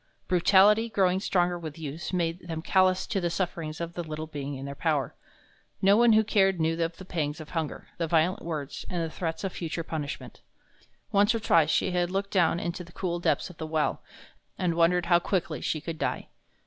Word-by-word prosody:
Brutality, 200 +5 +5
growing 190 -3 +2
stronger 175 -2 +1
with 155 -2 -7
use, 155 0 -5
made 170 -1 -2
them 160 -1 -4
callous 185 0 +3
to 200 -5 -2
the 175 - 0
sufferings 165 -3 -3
of 170 0 -4
the 175 - -4
little 155 -1 -5
being 145 -2 -5
in 135 +1 -6
their 140 - -5
power. 145 -3 0 0.7
No 195 +1 +5
one 235 0 +6
who 220 0 +5
cared 195 -4 +2
knew 165 +1 0
of 165 0 -3
the 190 - -10
pangs 155 -3 -2
of 155 - -10
hunger, 160 -3 -3
the 165 - 0
violent 165 +3 +2
words, 155 -4 -5
and 175 -2 -1
the 160 - -4
threats 165 +1 -4
of 195 - -3
future 165 0 -4
punishment. 155 -3 -6 0.7
Once 205 +2 +4
or - - 0
twice 165 -7 +3
she 185 - +2
had 175 -1 +1
looked 195 +2 -2
down 175 -3 +3
into 175 +1 -4
the 170 0 -16
cool 175 -2 -2
depths 175 - 0
of 170 - -17
the 160 - -5
well, 155 -1 0 0.6
and 180 -2 0
wondered 170 +1 +3
how 175 0 +5
quickly 180 0 -2
she 155 - -1
could 160 +1 -6
die. - - -2
170 Hz, 210 wpm, -28 LUFS, 160-185 Hz, 0.7 s, one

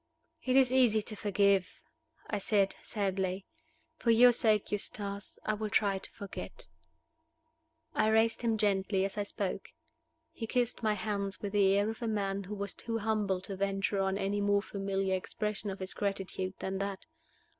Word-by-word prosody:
"It 255 0 +1
is 260 -2 +5
easy 235 -5 +4
to 215 - -5
forgive," 200 -2 +2 0.5
I 210 - -1
said, 200 -1 +2
sadly. 190 -2 -2 0.5
"For 235 - 0
your 240 +2 +8
sake, 215 -3 +2
Eustace, 200 -1 -1
I 215 - +1
will 215 0 -3
try 200 -2 +2
to - - -6
forget." 200 - -8 1.3
I - - +2
raised 225 +1 +3
him 230 -2 +1
gently 195 -2 +1
as 195 - -4
I - - +2
spoke. 200 -1 -3 0.6
He 230 -8 -6
kissed 245 +1 0
my 215 -2 +2
hands 200 -1 -3
with 200 - -2
the 195 -1 +4
air 205 +1 +2
of 225 +2 -5
a 235 - -1
man 200 -2 -1
who 210 +3 -5
was 200 -1 -3
too 230 -1 -4
humble 210 -4 0
to 195 +1 -6
venture 195 +1 0
on 195 0 +1
any 200 +1 -1
more 200 0 +2
familiar 195 -1 -1
expression 210 +2 -3
of 195 - -4
his 190 -1 -5
gratitude 190 -2 -3
than 190 0 -3
that. 200 -1 -4
200 Hz, 170 wpm, -32 LUFS, 195-215 Hz, 1.3 s, your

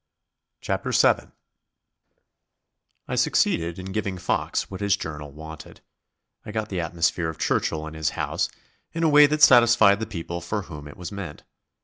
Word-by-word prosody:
CHAPTER - - -2
SEVEN - - +3 1.8
I - - -4
succeeded 85 0 +1
in 95 +1 -7
giving 95 -2 -2
Fox - - -1
what 95 0 -8
his 100 -1 +2
journal 75 -2 -7
wanted; 80 +1 -11 0.6
I - - -8
got 110 0 -3
the 95 - -3
atmosphere 85 0 0
of 80 - -7
Churchill 80 0 -1
and 80 0 -8
his 80 -1 0
house, - - -1 0.4
in 165 - -2
a 160 - +4
way 145 0 +8
that 150 +1 0
satisfied 120 -6 +6
the 110 - -3
people 85 -1 -5
for 100 +4 -3
whom 75 -5 -10
it 75 - -12
was 90 -2 -7
meant. 100 -7 -7
90 Hz, 160 wpm, -24 LUFS, 80-105 Hz, 1.8 s, way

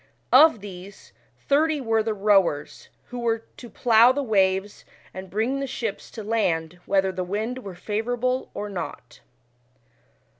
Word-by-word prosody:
Of 265 -5 +7
these, 195 0 -11 0.2
thirty 305 +2 +1
were 225 -4 +1
the 220 0 -2
rowers, 195 -8 +1 0.2
who 245 - -6
were 230 -1 -1
to 240 - -10
plough 235 +1 +5
the 285 +2 -2
waves 195 -3 +1 0.3
and 185 0 -8
bring 225 +8 -1
the 275 - -3
ships 230 -5 -5
to 220 - -8
land 180 -6 -1
whether 195 -1 +2
the 185 -1 -3
wind 215 +7 -3
were 195 -7 -9
favourable 245 +7 -2
or 210 - -4
not. 175 - -7
215 Hz, 145 wpm, -24 LUFS, 190-245 Hz, 0.3 s, Of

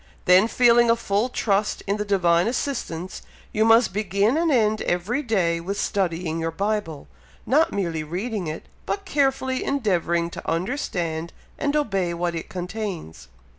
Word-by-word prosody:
Then 185 +4 +6
feeling 240 0 +4
a 230 - +5
full 215 +1 0
trust 210 -4 0
in 200 +1 0
the 210 - -2
Divine 175 -3 +3
assistance, 210 - -3 0.3
you 215 - +2
must 225 -1 +5
begin 205 +3 +1
and 330 0 +2
end 215 -4 +2
every 195 +10 -1
day 185 - +1
with 195 +4 -4
studying 170 -4 -1
your 165 0 -1
Bible, 195 -3 -3 0.4
not 315 +7 +3
merely 170 -5 -2
reading 185 +4 -3
it, 155 +1 -5 0.2
but 400 0 -2
carefully 270 -5 0
endeavouring 170 -10 0
to - - -6
understand 170 - -2 0.3
and 285 0 0
obey 195 -12 0
what 170 0 -1
it 165 - -5
contains. 180 - -6
200 Hz, 150 wpm, -24 LUFS, 170-235 Hz, 0.4 s, Then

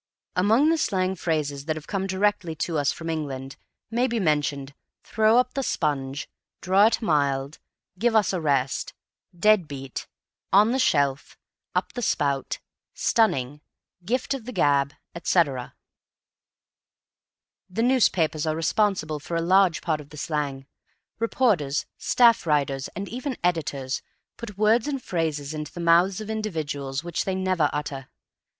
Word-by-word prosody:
Among 225 - +4
the 330 - +1
slang 185 -7 0
phrases 150 -5 -2
that 155 -1 -1
have 155 -1 -8
come 195 -2 -2
directly 190 -3 0
to 165 0 -1
us 145 -1 +2
from 165 - -7
England 140 -4 -4 0.4
may 245 +3 +2
be 235 -2 -1
mentioned 145 -5 0 0.3
"throw 220 +1 +3
up 250 0 +2
the 275 - -1
sponge," 140 - -2 0.3
"draw 195 +4 +4
it 230 - 0
mild," 140 -4 0 0.4
"give 235 +1 +2
us 210 -3 +3
a 180 - -1
rest," 140 -4 0 0.4
"dead 210 -2 +4
beat," 135 -2 -7 0.4
"on 210 +4 +5
the 260 - 0
shelf," 140 - +1 0.4
"up - - -1
the 245 - -4
spout," 140 - 0 0.4
"stunning," 145 - +1 0.4
"gift 250 +9 -1
of 260 -5 -6
the 250 - -5
gab," 145 - +2 0.2
etc. 150 -7 0 1.9
The 220 +5 -1
newspapers 175 - +2
are 155 - 0
responsible 165 -2 0
for 170 +3 -4
a - - 0
large 185 -1 +4
part 155 -3 0
of 145 - -15
the 150 - -12
slang. 145 -3 -3 0.5
Reporters, 210 - +1
staff 235 -7 +4
writers, 140 -3 +1
and 200 +3 -4
even 255 +2 -4
editors, 140 -6 -1 0.3
put 210 -4 -9
words 220 +3 +3
and 280 -2 -2
phrases 160 - -2
into 150 -1 -5
the 175 - -9
mouths 175 +3 +4
of 215 - -6
individuals 155 -10 -3
which 175 -1 -2
they 190 - -1
never 185 -5 +1
utter. 140 -2 -5
165 Hz, 145 wpm, -25 LUFS, 145-210 Hz, 1.9 s, on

